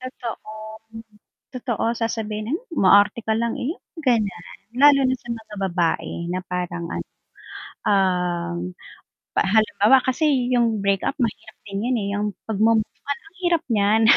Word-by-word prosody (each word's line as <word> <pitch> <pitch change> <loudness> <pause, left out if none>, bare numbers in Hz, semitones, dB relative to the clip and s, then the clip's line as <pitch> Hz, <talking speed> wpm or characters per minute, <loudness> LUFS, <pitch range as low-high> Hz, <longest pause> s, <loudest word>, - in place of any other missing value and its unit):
Totoo, 240 -4 -7 1.0
totoo. 245 -3 -2
Sasabihin 220 +1 -2
mo 340 - -1 0.2
umarte 205 +4 +6
lang 230 +1 -1
iyon, 310 - -4 0.2
ganyan. 215 -7 +1 0.3
Lalo 280 0 +7
na 260 - +1
sa 240 - -15
mga 220 -2 -10
babae 170 -1 0 0.2
na 180 +1 -1
parang 175 -1 -3
ano - - -4 0.8
ahm, 180 -3 +1 0.8
halimbawa 215 +4 +4
kasi, 260 -2 +1
'yung 230 -4 +2
breakup 200 +7 +1
mahirap 225 -3 -3
din 200 +1 -4
'yun, 255 - +2
eh. 200 - -2
'yung 205 +1 -1 0.2
pagmove-on 220 +1 +1 0.2
ang 330 +3 -19
hirap 345 -3 +2
niyan. 210 +1 +3
220 Hz, 125 wpm, -23 LUFS, 200-250 Hz, 1.0 s, Lalo